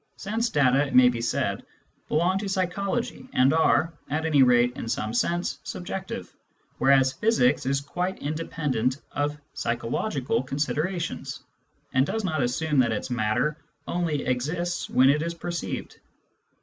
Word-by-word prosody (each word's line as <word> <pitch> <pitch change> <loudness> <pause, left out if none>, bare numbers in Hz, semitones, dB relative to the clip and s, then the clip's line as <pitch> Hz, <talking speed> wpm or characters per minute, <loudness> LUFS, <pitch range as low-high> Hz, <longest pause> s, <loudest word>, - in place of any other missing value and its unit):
Sense 225 +4 -1
data, 140 - +3
it 135 - -4
may 125 0 +8
be 120 -1 -3
said, 120 - -1 0.4
belong 175 +5 +2
to 200 -1 -3
psychology 200 +7 -2
and 130 +3 +4
are, 160 +1 +3 0.2
at 155 +3 -1
any 150 -4 +4
rate 125 -1 +4
in 115 - -5
some 110 -1 -2
sense, 175 +8 0
subjective, 190 +1 -6 0.5
whereas 135 -1 +4
physics 135 - +2
is 140 0 +1
quite 180 +6 -3
independent 145 -5 -1
of 145 +1 -1 0.2
psychological 125 - -1
considerations, 150 +1 -3 0.5
and 130 +1 +3
does 220 0 -2
not 160 -6 0
assume 140 +4 +1
that 120 -3 +3
its 110 +4 -3
matter 120 +6 +1 0.3
only 165 -5 -1
exists 160 +8 -1
when 130 +1 +5
it 145 +2 +4
is 170 +1 -3
perceived. 170 0 -5
145 Hz, 140 wpm, -26 LUFS, 130-175 Hz, 0.5 s, may